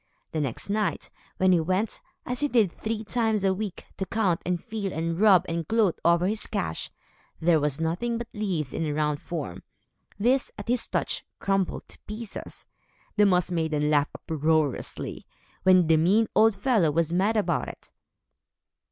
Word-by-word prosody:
The 155 Hz, -, -1 dB
next 135 Hz, -5 st, -3 dB
night, 210 Hz, 0 st, -1 dB, 0.3 s
when 185 Hz, 0 st, +4 dB
he 180 Hz, -, +5 dB
went, 185 Hz, +6 st, -1 dB, 0.2 s
as 250 Hz, 0 st, -3 dB
he 290 Hz, -, +3 dB
did 225 Hz, -9 st, +3 dB
three 220 Hz, +3 st, -4 dB
times 220 Hz, -2 st, 0 dB
a 190 Hz, -1 st, +3 dB
week, 200 Hz, -1 st, -5 dB
to 190 Hz, -, -2 dB
count, 195 Hz, -7 st, +1 dB
and 180 Hz, -1 st, 0 dB
feel, 210 Hz, -1 st, -4 dB
and 165 Hz, +1 st, -2 dB
rub, 200 Hz, -4 st, +6 dB
and 165 Hz, -1 st, -3 dB
gloat, 220 Hz, -6 st, +2 dB
over 170 Hz, +1 st, +4 dB
his 210 Hz, +3 st, -1 dB
cash, 80 Hz, -2 st, -3 dB, 0.5 s
there 165 Hz, -1 st, +4 dB
was 145 Hz, -1 st, -1 dB
nothing 180 Hz, +9 st, -1 dB
but 235 Hz, 0 st, -5 dB
leaves 180 Hz, -, -2 dB
in 165 Hz, -, -2 dB
a 150 Hz, -2 st, -1 dB
round 150 Hz, -1 st, 0 dB
form. 150 Hz, -, -5 dB, 0.6 s
These, 250 Hz, +5 st, +2 dB
at 205 Hz, +2 st, -8 dB
his 245 Hz, -1 st, +1 dB
touch, -, -, -1 dB
crumbled 195 Hz, -2 st, -1 dB
to -, -, -11 dB
pieces. 215 Hz, 0 st, -7 dB, 0.5 s
The 210 Hz, -1 st, +5 dB
Moss 180 Hz, -2 st, +2 dB
Maidens 160 Hz, -3 st, 0 dB
laughed 145 Hz, -1 st, +2 dB
uproariously, 155 Hz, -3 st, -1 dB, 0.3 s
when 185 Hz, -2 st, +5 dB
the 160 Hz, 0 st, +4 dB
mean 195 Hz, +8 st, +4 dB
old 220 Hz, -1 st, +5 dB
fellow 215 Hz, -, +2 dB
was 165 Hz, +2 st, 0 dB
mad 200 Hz, +5 st, +2 dB
about 210 Hz, -, 0 dB
it. -, -, -11 dB
185 Hz, 170 wpm, -26 LUFS, 160-215 Hz, 0.6 s, rub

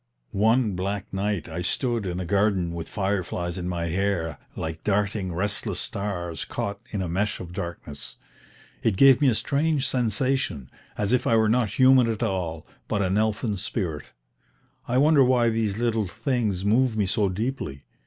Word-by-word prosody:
One 110 Hz, +2 st, +3 dB
black 100 Hz, +2 st, -3 dB
night 100 Hz, -1 st, -1 dB
I 85 Hz, +1 st, -4 dB
stood 115 Hz, +3 st, -1 dB
in 90 Hz, 0 st, -3 dB
a 90 Hz, -, -3 dB
garden 95 Hz, -2 st, +1 dB
with 85 Hz, -1 st, -5 dB
fireflies 95 Hz, -3 st, -2 dB
in 90 Hz, 0 st, -3 dB
my 85 Hz, -1 st, -2 dB
hair 85 Hz, -3 st, -1 dB, 0.2 s
like 80 Hz, 0 st, -5 dB
darting 100 Hz, -2 st, 0 dB
restless 100 Hz, +4 st, -2 dB
stars 90 Hz, -5 st, -4 dB
caught 100 Hz, 0 st, -4 dB
in 100 Hz, -3 st, -2 dB
a -, -, -3 dB
mesh 95 Hz, +5 st, -1 dB
of 90 Hz, -1 st, -8 dB
darkness. 85 Hz, -6 st, -6 dB, 0.7 s
It 105 Hz, -4 st, +1 dB
gave 135 Hz, +2 st, +7 dB
me 145 Hz, -, +5 dB
a 115 Hz, -, +2 dB
strange 145 Hz, +3 st, +1 dB
sensation, 125 Hz, -, 0 dB, 0.3 s
as 105 Hz, +1 st, 0 dB
if 125 Hz, 0 st, +2 dB
I 115 Hz, -, +4 dB
were 110 Hz, -1 st, +4 dB
not 110 Hz, -2 st, +1 dB
human 130 Hz, -2 st, +6 dB
at 110 Hz, 0 st, -2 dB
all, 90 Hz, -7 st, -2 dB, 0.2 s
but 100 Hz, -, 0 dB
an 95 Hz, +1 st, +1 dB
elfin 105 Hz, 0 st, 0 dB
spirit. 85 Hz, -6 st, -3 dB, 0.8 s
I 125 Hz, -, +1 dB
wonder 145 Hz, 0 st, +6 dB
why 125 Hz, -2 st, +3 dB
these 110 Hz, -3 st, -1 dB
little 115 Hz, -3 st, 0 dB
things 110 Hz, -3 st, -1 dB
move 115 Hz, +2 st, +3 dB
me 105 Hz, -, +2 dB
so 100 Hz, +1 st, +1 dB
deeply? 95 Hz, -, -3 dB
100 Hz, 170 wpm, -25 LUFS, 90-115 Hz, 0.8 s, gave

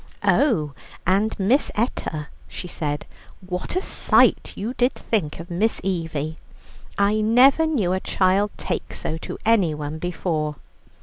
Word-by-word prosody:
"Oh, 165 Hz, -, +2 dB, 0.3 s
and, 195 Hz, +5 st, +2 dB
Miss 230 Hz, +9 st, +3 dB
Etta," 160 Hz, -, -2 dB, 0.2 s
she 180 Hz, -, -7 dB
said, 150 Hz, -3 st, -3 dB, 0.4 s
"what 180 Hz, -, -4 dB
a 370 Hz, -, 0 dB
sight -, -, +3 dB
you 220 Hz, +5 st, -3 dB
did 250 Hz, 0 st, +2 dB
think 165 Hz, -11 st, -2 dB
of 170 Hz, +2 st, -9 dB
Miss 210 Hz, +6 st, +1 dB
Evie! 160 Hz, -4 st, -2 dB, 0.6 s
I 205 Hz, +2 st, +3 dB
never 260 Hz, +8 st, +5 dB
knew 215 Hz, -, +1 dB
a 185 Hz, -, 0 dB
child 190 Hz, +2 st, +2 dB
take -, -, -4 dB
so 160 Hz, +1 st, -4 dB
to -, -, -6 dB
anyone 160 Hz, -9 st, +1 dB
before. 160 Hz, -3 st, -2 dB
185 Hz, 135 wpm, -23 LUFS, 160-220 Hz, 0.6 s, never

